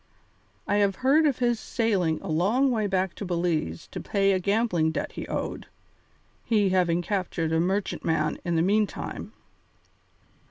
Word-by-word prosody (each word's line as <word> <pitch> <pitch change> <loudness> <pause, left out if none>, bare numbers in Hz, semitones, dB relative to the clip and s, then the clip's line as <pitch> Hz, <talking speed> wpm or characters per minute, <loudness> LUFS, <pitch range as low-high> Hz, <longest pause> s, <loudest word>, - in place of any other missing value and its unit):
I 205 - +2
have 200 -2 +2
heard 305 +4 +5
of 275 - 0
his 240 -2 +1
sailing 195 -11 0
a - - -6
long 210 - +2
way 220 -3 0
back 190 -1 0
to - - -5
Belize 170 - -1
to - - -5
pay 195 -1 +1
a 190 - +2
gambling 200 -4 +1
debt 160 - -3
he - - -7
owed, - - -4 0.8
he 210 -4 +2
having 175 -2 +2
captured 175 -4 -2
a 160 - +3
merchantman 170 -4 0
in 170 -2 -1
the 165 - +3
meantime." 205 +3 -1
190 Hz, 155 wpm, -26 LUFS, 170-215 Hz, 0.8 s, heard